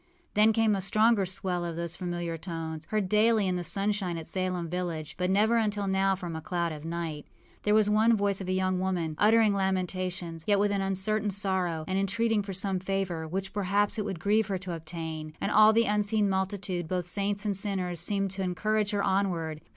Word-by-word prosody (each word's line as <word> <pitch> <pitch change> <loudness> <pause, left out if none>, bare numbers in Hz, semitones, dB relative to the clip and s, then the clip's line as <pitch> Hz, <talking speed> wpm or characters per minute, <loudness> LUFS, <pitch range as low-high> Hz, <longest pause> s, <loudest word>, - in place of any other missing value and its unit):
Then 215 +1 +5
came 220 -1 +2
a 195 - -2
stronger 215 +1 +3
swell 185 -1 -2
of 170 -1 -4
those 170 0 -3
familiar 175 -2 -3
tones, 160 -2 -6
heard 215 0 -1
daily 215 +1 +3
in 185 - 0
the 180 - -2
sunshine 195 -2 -1
at 165 - -6
Salem 185 -1 -2
village, 165 -3 -4
but 180 0 -1
never 215 +4 +3
until 210 -2 0
now 195 0 +2
from 175 -3 -6
a 160 - -5
cloud 170 0 -2
of 150 -1 -7
night 165 -2 -4 0.3
There 210 0 +2
was 215 -1 +4
one 220 +2 +4
voice 200 -1 0
of 190 - -5
a - - -1
young 185 0 +1
woman, 175 -4 -1
uttering 215 0 +5
lamentations, 185 -3 -2
yet 205 -1 +4
with 205 +1 +2
an 200 -1 0
uncertain 195 +2 0
sorrow, 185 -5 -1
and 190 +1 0
entreating 220 +3 +1
for 200 -1 -6
some 190 0 +1
favor, 185 -4 -2
which, 190 +3 -4
perhaps, 205 +1 +1
it - - 0
would 190 -5 -4
grieve 210 +4 +2
her 195 -2 -1
to 185 -1 -5
obtain; 160 -1 -6
and - - -1
all 215 +1 +7
the 230 +1 +3
unseen 210 0 +1
multitude, 190 -2 -2
both 180 0 -2
saints 200 +3 -1
and 205 -2 0
sinners, 190 -3 -2
seemed 195 +2 0
to 195 +1 -4
encourage 210 +3 0
her 205 -1 0
onward. 170 -5 0
190 Hz, 205 wpm, -28 LUFS, 175-205 Hz, 0.3 s, all